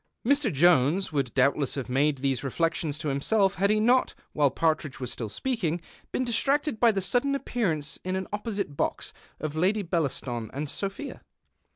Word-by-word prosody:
Mr. 280 -2 +3
Jones 165 +3 +3
would 140 -5 -1
doubtless 135 +1 +2
have 135 -3 -4
made 140 +3 +2
these 135 -1 -1
reflections 160 +1 -1
to 150 - -3
himself 195 +8 +2
had 200 +1 +1
he 215 0 +3
not, 245 +4 +3 0.2
while 145 -2 +3
Partridge 155 0 0
was 125 -3 -3
still 115 -3 -4
speaking, 175 - -1 0.3
been 255 - 0
distracted 275 +2 +1
by 235 - +6
the 195 -2 -1
sudden 245 +9 +1
appearance 170 - -2
in 185 +1 -2
an 190 0 -3
opposite 205 -7 -3
box - - -2 0.3
of 155 0 -4
Lady 195 +6 +2
Bcllaston 135 - -2
and 145 +3 -3
Sophia. 195 - -4
165 Hz, 170 wpm, -27 LUFS, 140-215 Hz, 0.3 s, by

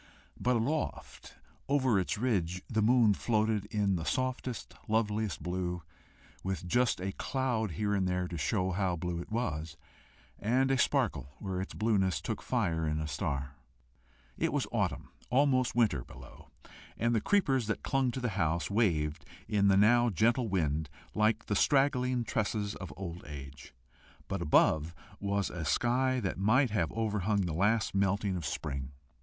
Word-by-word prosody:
But 125 +1 +2
aloft 140 +7 -3 0.3
over 130 -7 +3
its 95 +4 -1
ridge 95 -7 0
the 110 -2 0
moon 115 -1 +5
floated 110 -1 0
in 100 -3 0
the 80 - -4
softest, 130 +1 -2
loveliest 110 -2 0
blue, 90 -1 -3 0.6
with 95 -3 -3
just 120 +4 +2
a 95 +1 -2
cloud 120 - -1
here 105 +5 -1
and 95 -2 +1
there 90 0 0
to 90 - -6
show 90 +5 0
how 95 -1 0
blue 85 0 -3
it 95 - -11
was, 80 -9 -2 0.6
and 130 +5 +2
a 135 - +3
sparkle 80 - 0
where 95 -2 -3
its 95 - -6
blueness 100 -4 +1
took - - -4
fire 80 -2 0
in 75 0 0
a 75 - -3
star. 70 -3 -3 0.9
It - - +1
was - - 0
autumn, - - -1 0.2
almost 130 -1 +3
winter, 105 - +2
below, - - -14 0.5
and 115 +1 +1
the 110 - +2
creepers 135 - +2
that 105 - -2
clung 135 -2 +1
to 125 - -3
the 125 -1 -1
house 85 -3 -1
waved 80 -8 +1 0.2
in 100 -1 +2
the 95 -1 +5
now 120 +4 +5
gentle 115 +4 +2
wind 80 -5 0 0.2
like 110 +1 +2
the 105 - -1
straggling 130 -2 +2
tresses 105 -2 -1
of 95 - -8
old 90 -2 -6
age; 70 -2 -9 0.6
but 100 -2 -3
above 80 0 +3 0.2
was 100 0 -1
a 85 -3 -5
sky 125 - +1
that 95 -2 -3
might 120 +5 +3
have 90 -7 0
overhung 105 -2 0
the 85 -4 -2
last 105 +6 +2
melting 100 0 +1
of 85 - -3
spring 70 -3 -3
into - - -6
summer. 70 - -15
100 Hz, 165 wpm, -31 LUFS, 90-120 Hz, 0.9 s, moon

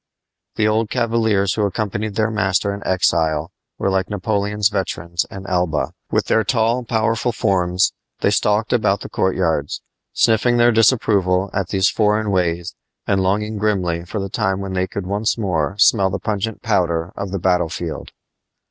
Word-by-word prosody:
The 105 - +2
old 110 0 +1
cavaliers 110 -5 +1
who 110 - -1
accompanied 105 +1 -2
their 110 0 +1
master 100 -1 0
in 100 - -7
exile 80 -4 +1 0.3
were 95 - 0
like 95 -1 0
Napoleon's 105 0 0
veterans 85 -4 -2
in 95 0 -9
Elba. 90 -5 0 0.2
With - - +1
their 110 - +2
tall, 115 +3 +1
powerful 115 +1 0
forms 90 -4 +1 0.3
they - - +2
stalked 105 +3 +1
about 100 -4 +1
the - - -7
courtyards, 85 -6 -1 0.3
sniffing 120 +2 +2
their 120 0 +5
disapproval 100 -5 +2
at 95 -4 -1
these 95 +1 +2
foreign 105 -1 +1
ways 90 -1 -1 0.3
and 100 -1 +1
longing 105 +3 -1
grimly 90 -5 0
for 95 +5 -5
the 100 - -3
time 95 -1 -1
when 95 -1 -5
they 95 0 0
could 95 +1 -5
once 105 +5 -1
more 95 -4 -1
smell 100 -2 +4
the 95 - -2
pungent 105 +2 -3
powder 90 -6 0
of 100 - -4
the 100 - -3
battle 90 -2 +1
field. 85 -1 -6
100 Hz, 165 wpm, -20 LUFS, 90-110 Hz, 0.3 s, their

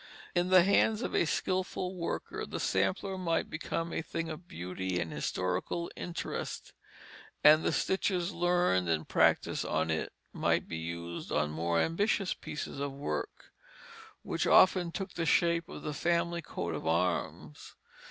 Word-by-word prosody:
In 175 0 +1
the 185 -1 +7
hands 210 +4 +3
of - - -3
a - - +3
skilful 185 +2 -1
worker, 170 -2 -4
the - - -5
sampler 95 - 0
might 170 -2 0
become 165 +1 -3
a - - -1
thing 165 0 -4
of 160 +3 -8
beauty 90 - -3
and 80 -2 -3
historical 90 - -2
interest; 175 - -5 0.7
and 155 +1 +8
the - - +2
stitches 190 -1 0
learned 175 - +2
and 80 -1 0
practised - - +2
on 80 +1 0
it 80 - -2 0.2
might - - +1
be 80 - -4
used 85 +1 -5
on 75 0 +1
more 85 +2 0
ambitious 195 - +1
pieces 145 - -6
of 140 0 -2
work, 140 +1 -5 0.7
which - - -1
often 185 -2 +5
took 195 +1 -5
the 165 -1 -2
shape 170 +2 +2
of - - -8
the 150 - -3
family 170 +2 0
coat 85 - -4
of 80 +1 -4
arms. 80 -3 -1
165 Hz, 150 wpm, -31 LUFS, -, 0.7 s, and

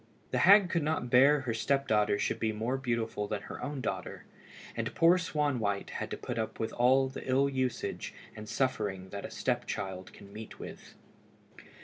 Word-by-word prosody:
The 125 - +1
hag 190 +3 +7
could 170 - +1
not 150 -5 -1
bear 135 +3 +6
her 125 -3 -2
step 140 +4 0
daughter 105 -1 +3
should - - -1
be 110 -1 +1
more 110 +4 -1
beautiful 115 -5 -2
than 105 -1 -3
her - - -8
own 145 -2 -3
daughter, - - -4 0.5
and - - -3
poor 170 +2 +5
Swanwhite 140 - -1
had - - -4
to - - -4
put - - -4
up 110 - -3
with 110 - -2
all 130 +2 +4
the 130 - -7
ill 135 +2 +4
usage 130 -2 -2 0.2
and 110 -1 -8
suffering 105 -7 -1
that 100 0 -5
a - - -6
step 120 -1 -1
child 95 -3 -4
can 100 0 -14
meet 110 0 -9
with. - - -10
125 Hz, 190 wpm, -31 LUFS, 105-140 Hz, 0.5 s, hag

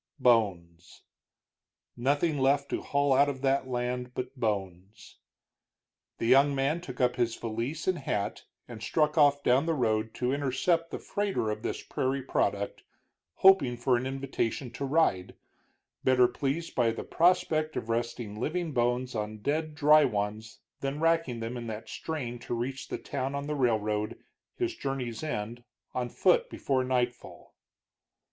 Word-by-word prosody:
Bones. 95 -9 +1 0.9
Nothing 145 +5 +1
left 140 +1 +2
to - - -2
haul 140 -1 +1
out 140 +2 +5
of 130 -2 -5
that 135 -1 +2
land 125 0 -3
but 125 +2 -4
bones. 100 -4 -4 1.0
The - - -3
young 135 +4 +5
man 140 +5 0
took 180 - -9
up 125 -1 +2
his 120 -2 +1
valise 115 +7 -4
and 185 -3 +1
hat 105 -7 -3 0.2
and 115 -3 -9
struck 150 +5 +1
off 145 -2 +4
down 130 +6 +3
the 165 - +1
road 110 -4 0
to 125 +1 0
intercept 145 +5 +1
the - - -4
freighter 200 - -1
of 105 0 -4
this - - -4
prairie 135 +1 -1
product, 100 -5 -1 0.5
hoping 150 -11 +5
for 125 +1 +2
an 120 +2 -1
invitation 135 -2 -2
to 140 +3 -4
ride, 135 - +1 0.7
better 125 -1 +5
pleased 145 +7 -3
by 120 -2 +2
the 115 - -4
prospect 165 -3 +2
of - - -3
resting 115 -2 -3
living 165 +5 -2
bones 125 0 0
on 110 -1 -3
dead 155 +1 -1
dry 150 +1 +6
ones 105 0 -3 0.2
than 140 +2 -3
racking 165 -7 +1
them 115 +2 -4
in 120 -1 -6
that 110 0 -6
strain 125 -6 -4
to 120 - -4
reach 130 +3 -4
the - - -4
town 135 0 -3
on 140 0 -3
the 150 - -2
railroad, 110 -5 0 0.4
his 360 -1 -2
journey's 130 - -4
end, 120 -5 -4 0.3
on 125 -1 -2
foot - - +3
before 130 - 0
nightfall. 125 -1 -3
130 Hz, 155 wpm, -29 LUFS, 115-145 Hz, 1.0 s, dry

